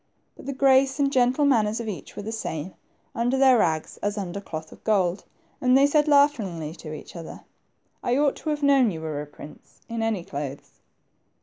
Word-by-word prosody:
But - - -13
the 280 - -2
grace 265 0 +4
and 280 -1 +1
gentle 255 +2 +3
manners 225 -5 +2
of 230 - -5
each 185 -9 -7
were 205 - -6
the 220 - -5
same 185 -6 -4 0.4
under 245 +3 0
their 265 -3 +5
rags 160 -5 0
as 205 +1 -3
under 195 -1 -4
cloth 160 -4 -7
of - - -15
gold, 190 -4 +1 0.4
and 255 0 +5
they 275 - +6
said 295 +1 +3
laughingly 225 - +2
to 155 - -9
each 155 - -9
other, 165 -2 -8 0.6
I 245 +1 +1
ought 285 -1 +2
to 315 - -5
have 300 -1 -2
known 275 -4 +5
you 165 -5 -5
were 155 -2 -4
a 150 - -8
prince, 145 +1 -14
in 230 -1 -4
any 225 -5 -1
clothes 140 -3 -7
225 Hz, 200 wpm, -25 LUFS, 170-270 Hz, 0.6 s, they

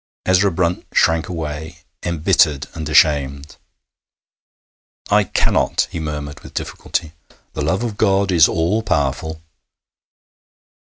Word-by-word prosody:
Ezra 95 +2 +4
Brunt 85 0 -1
shrank 80 0 +2
away, 80 -1 -6 0.2
embittered 80 -4 +2
and 80 -1 -5
ashamed. 70 -2 +2 1.5
'I - - +4
cannot,' - - +1
he 85 - -4
murmured 75 -2 -5
with - - -14
difficulty. 80 - -3 0.4
'The 75 - -4
love 90 +10 0
of 110 -4 -4
God 100 -2 +2
is 85 -3 +6
all 90 +6 0
powerful.' 80 -2 -2
80 Hz, 110 wpm, -19 LUFS, 75-90 Hz, 1.5 s, is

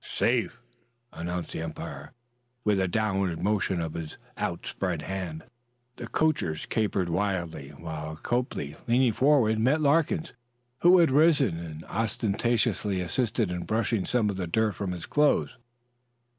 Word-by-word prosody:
"Safe!" - - 0 0.6
announced 85 0 -4
the - - -4
umpire, 80 -1 -6 0.5
with 105 -2 +2
a 95 - +2
downward 95 -3 0
motion 100 -3 +1
of 80 -2 -3
his 80 -2 -6 0.2
outspread 85 -1 -3
hand. 90 -5 -4 0.5
The 120 - -6
coachers 145 - 0
capered 105 -5 0
wildly, 85 -5 -2
while 80 -1 -6
Copley, 120 - -2
leaping 120 0 +3
forward, 130 -4 +3
met 130 +8 +3
Larkins, 160 +3 +2 0.5
who 180 +2 +7
had 170 -6 +5
risen, 140 - +4
and 80 -2 -7
ostentatiously 110 -2 0
assisted 110 +2 0
in 90 -1 -3
brushing 110 -2 0
some 110 -2 +1
of 95 - -6
the 90 -2 -2
dirt 110 +4 +1
from 95 -1 -3
his 90 -2 -5
clothes. 150 0 +2
100 Hz, 135 wpm, -27 LUFS, 85-120 Hz, 0.6 s, who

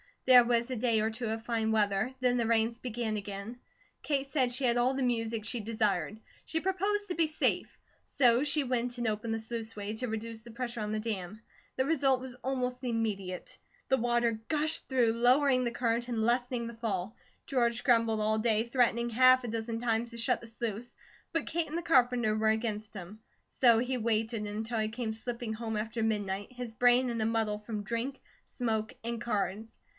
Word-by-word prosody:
There 250 -1 +8
was 235 +1 +1
a - - -1
day 230 -1 +2
or 220 - +1
two 230 +1 -4
of 225 +1 -4
fine 225 -2 0
weather; 210 +2 +1
then 250 -1 +3
the 235 -2 +1
rains 230 +1 +2
began 235 -3 -3
again. 205 +4 -6 0.4
Kate 280 -2 0
said 270 -3 +1
she 255 +3 -3
had 240 -1 +3
all 250 +2 +3
the 270 0 -1
music 225 -3 -1
she 240 +1 -2
desired; 215 -1 -1 0.3
she 320 - -1
proposed 395 +4 0
to 355 - -2
be 330 -1 +3
safe; 310 - +1 0.5
so 245 -1 +5
she 295 0 +2
went 245 -1 -1
and 240 -1 -1
opened 220 +1 -2
the 225 - -1
sluiceway 220 -2 -5
to 250 - -2
reduce 220 0 -5
the 235 +1 -12
pressure 240 0 -4
on 210 0 -3
the 215 - -1
dam. 215 -2 -4 0.3
The 260 - +1
result 275 -4 +3
was 255 -1 -7
almost 255 -1 -3
immediate. 210 -6 -3 0.3
The 265 - +4
water 240 -2 +1
gushed 310 +1 +1
through, 245 -4 +2
lowering 255 +2 +4
the - - +1
current 235 0 0
and 230 -3 -1
lessening 245 +1 0
the 235 0 -7
fall. 215 -3 -3 0.3
George 240 -3 +1
grumbled 230 -3 +3
all 215 +1 +2
day, 220 -1 +2
threatening 235 -1 +1
half 255 +2 +5
a - - -4
dozen 225 0 -3
times 235 0 0
to 235 - -9
shut 245 +1 +1
the 230 - -10
sluice; 230 +1 -5 0.4
but 330 -3 -1
Kate 330 0 -1
and 315 - -4
the - - -2
carpenter 245 -8 +3
were 220 0 +2
against 220 -1 -2
him, 195 +3 -8 0.3
so 235 -3 +5
he 250 +2 -1
waited 225 -1 0
until 220 +2 -3
he 215 0 0
came 225 -1 -3
slipping 235 0 -5
home 220 0 -4
after 225 +2 -3
midnight, 205 -1 -2
his 245 -2 -6
brain 245 +2 +4
in 230 -2 -2
a - - +1
muddle 220 -2 0
from 210 -1 -5
drink, 235 +6 -3 0.3
smoke, 220 -3 -2
and 235 0 -3
cards. 215 -1 -2
235 Hz, 200 wpm, -30 LUFS, 220-250 Hz, 0.5 s, There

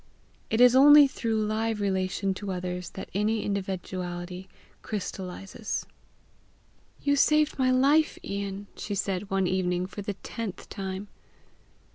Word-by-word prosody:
It 220 - 0
is 250 0 +7
only 290 +2 +9
through 230 -4 -2
live 220 0 -1
relation 190 0 0
to 195 +1 -5
others 180 -1 -4
that 190 - -7
any 210 +2 +1
individuality 185 -2 -4 0.3
crystallizes. 195 0 -5 1.2
"You 285 0 +3
saved 305 +1 +3
my 255 -1 +3
life, 280 +5 +3
Ian!" 200 0 -4
she 205 - -4
said 195 0 -2
one 195 -1 +1
evening 180 -1 0
for 190 +2 -7
the 200 0 -4
tenth 210 0 -6
time. 195 0 -5
200 Hz, 125 wpm, -27 LUFS, 185-225 Hz, 1.2 s, only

